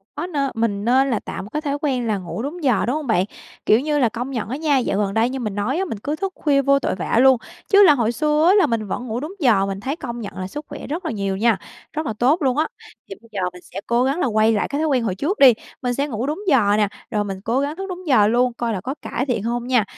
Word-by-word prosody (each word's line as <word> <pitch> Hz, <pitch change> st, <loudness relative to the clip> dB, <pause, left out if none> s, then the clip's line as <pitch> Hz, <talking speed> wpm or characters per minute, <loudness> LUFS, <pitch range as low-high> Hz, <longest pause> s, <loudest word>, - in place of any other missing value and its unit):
Có, 305 Hz, +4 st, -3 dB
nê 315 Hz, -6 st, -3 dB, 0.2 s
mình 210 Hz, -2 st, -1 dB
nên 265 Hz, +3 st, +3 dB
là 225 Hz, -5 st, 0 dB
tạo -, -, -6 dB
một 205 Hz, -, -10 dB
cái 300 Hz, -, -3 dB
thói 285 Hz, -2 st, -2 dB
quen 255 Hz, -5 st, 0 dB
là 210 Hz, -2 st, +1 dB
ngủ 185 Hz, +4 st, -6 dB
đúng 305 Hz, +6 st, -5 dB
giờ, 250 Hz, -7 st, +2 dB
đúng 250 Hz, -, 0 dB
hông 305 Hz, -2 st, -4 dB
bạn? 190 Hz, -5 st, +2 dB, 0.4 s
Kiểu 215 Hz, -, +5 dB
như 295 Hz, +1 st, 0 dB
là, 240 Hz, -, +3 dB
công 245 Hz, +5 st, -5 dB
nhận 225 Hz, -4 st, -3 dB
á 265 Hz, -, -3 dB
nha, 300 Hz, -2 st, +2 dB
dạo 240 Hz, -6 st, 0 dB
gần 200 Hz, -1 st, 0 dB
đây 225 Hz, +3 st, +2 dB
như 265 Hz, -, -4 dB
mình 215 Hz, -5 st, -3 dB
nói 225 Hz, +9 st, -1 dB
á, 385 Hz, -, 0 dB
mình 225 Hz, -, -5 dB
cứ 290 Hz, +7 st, -3 dB
thức 385 Hz, +3 st, -3 dB
khuya 280 Hz, -2 st, +2 dB
vô 275 Hz, 0 st, +3 dB
tội -, -, -1 dB
vạ 185 Hz, +5 st, 0 dB
luôn, 265 Hz, 0 st, +6 dB, 0.3 s
chứ 405 Hz, 0 st, +7 dB
là 315 Hz, -6 st, +8 dB
hồi 235 Hz, -4 st, +1 dB
xưa 300 Hz, +5 st, +2 dB
á 370 Hz, -, +6 dB
là 400 Hz, -2 st, +5 dB
mình 220 Hz, -3 st, -1 dB
vẫn 245 Hz, +6 st, -4 dB
ngủ 225 Hz, +1 st, -2 dB
đúng 305 Hz, +7 st, -6 dB
giờ, 225 Hz, -, +3 dB
mình 195 Hz, 0 st, -4 dB
thấy 270 Hz, +8 st, -3 dB
công 240 Hz, -6 st, -6 dB
nhận 195 Hz, -3 st, -7 dB
là 185 Hz, 0 st, -4 dB
sức 295 Hz, +9 st, -7 dB
khỏe -, -, -8 dB
rất 335 Hz, +5 st, -4 dB
là -, -, -1 dB
nhiều 195 Hz, -2 st, -2 dB
nha, 225 Hz, -1 st, +3 dB, 0.4 s
rất 310 Hz, +1 st, -3 dB
là 220 Hz, -, -2 dB
tốt 285 Hz, +8 st, +3 dB
luôn 265 Hz, -1 st, +1 dB
á. 315 Hz, -, +2 dB, 0.4 s
Thì 195 Hz, -, -6 dB
bây 230 Hz, -, -20 dB
giờ 200 Hz, -3 st, -3 dB
mình 180 Hz, -, -12 dB
sẽ 195 Hz, -, -8 dB
cố 235 Hz, +1 st, +2 dB
gắng 275 Hz, +6 st, 0 dB
là -, -, +1 dB
quay 220 Hz, -1 st, +3 dB
lại 210 Hz, -, 0 dB
cái 285 Hz, -, -3 dB
thói 315 Hz, -, +1 dB
quen 260 Hz, -5 st, +1 dB
hồi 200 Hz, -5 st, -1 dB
trước 325 Hz, -, -2 dB
đi, 265 Hz, -3 st, +8 dB, 0.3 s
mình 245 Hz, -2 st, -1 dB
sẽ 280 Hz, +4 st, -1 dB
ngủ 235 Hz, -2 st, -3 dB
đúng 300 Hz, +7 st, -3 dB
giờ 220 Hz, -, +4 dB
nè, 210 Hz, -1 st, +3 dB, 0.2 s
rồi 210 Hz, -1 st, 0 dB
mình 195 Hz, -2 st, -6 dB
cố 230 Hz, +6 st, 0 dB
gắng 285 Hz, +2 st, -2 dB
thức 385 Hz, +2 st, -6 dB
đúng 365 Hz, -1 st, -7 dB
giờ 215 Hz, -7 st, +5 dB
luôn, 245 Hz, +2 st, +2 dB
coi 235 Hz, -1 st, -2 dB
là 185 Hz, -, -3 dB
có 265 Hz, +8 st, -4 dB
cải 255 Hz, -, -3 dB
thiện 245 Hz, -7 st, -1 dB
hông 240 Hz, +1 st, -2 dB
nha. 250 Hz, -4 st, +3 dB
245 Hz, 310 wpm, -21 LUFS, 215-290 Hz, 0.4 s, là